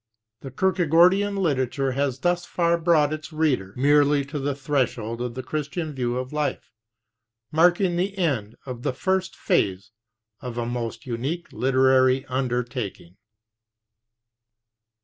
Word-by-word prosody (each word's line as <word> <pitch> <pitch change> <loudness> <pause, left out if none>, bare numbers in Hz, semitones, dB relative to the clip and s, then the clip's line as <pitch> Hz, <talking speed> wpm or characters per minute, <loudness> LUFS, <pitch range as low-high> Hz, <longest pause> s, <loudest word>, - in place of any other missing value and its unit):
The 135 - -8
Kierkegaardian 185 +5 +3
literature 135 -6 0
has 135 -1 -1
thus 175 0 +1
far 170 -1 +1
brought 160 -3 +3
its 155 +2 -7
reader 145 -12 0
merely 145 +1 +4
to 145 +1 -5
the 140 0 -2
threshold 125 -5 -1
of 120 -1 -4
the 130 - -5
Christian 155 +1 -4
view 125 -2 -2
of 130 +2 -5
life, 150 -1 -2 0.8
marking 175 +2 +3
the 195 +2 -1
end 125 - -1
of 125 -3 -6
the 125 - -1
first 185 +6 -1
phase 100 - 0 0.5
of 125 -2 -7
a 120 - -1
most 115 -1 -4
unique 135 +8 -4
literary 130 0 +3
undertaking. 120 -8 -3
140 Hz, 130 wpm, -24 LUFS, 125-170 Hz, 0.8 s, merely